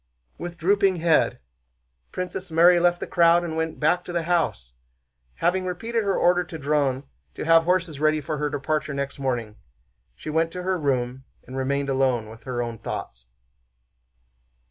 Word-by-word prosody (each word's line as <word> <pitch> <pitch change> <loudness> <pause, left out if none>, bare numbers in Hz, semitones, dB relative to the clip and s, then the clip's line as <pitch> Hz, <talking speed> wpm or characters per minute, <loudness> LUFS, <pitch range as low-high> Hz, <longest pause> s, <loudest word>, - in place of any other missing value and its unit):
With 175 0 -6
drooping 195 +2 +3
head 165 -2 +2 0.7
Princess 185 +1 -5
Mary 170 +2 +6
left 175 0 +2
the - - -4
crowd 170 0 +4
and 165 -2 -4
went 160 0 -2
back 155 +4 +2
to - - -6
the 170 -1 -1
house. 160 - -1 0.6
Having 185 +2 0
repeated 225 +6 -2
her 200 -1 0
order 180 0 +3
to 165 - -8
Dron 140 -3 0 0.3
to - - -5
have 165 0 +5
horses 175 -4 0
ready 155 0 +2
for 150 +1 -4
her 150 0 0
departure 145 +1 -2
next 140 0 -4
morning, 120 -5 -2 0.6
she 155 - -7
went 165 +1 +1
to 180 - -5
her 185 -1 0
room 130 -2 -1 0.2
and 130 - -9
remained 140 +1 -1
alone 130 -5 +1
with 115 +1 -13
her 125 -2 -2
own 115 -2 -6
thoughts. - - -6
160 Hz, 165 wpm, -24 LUFS, 135-175 Hz, 0.7 s, Mary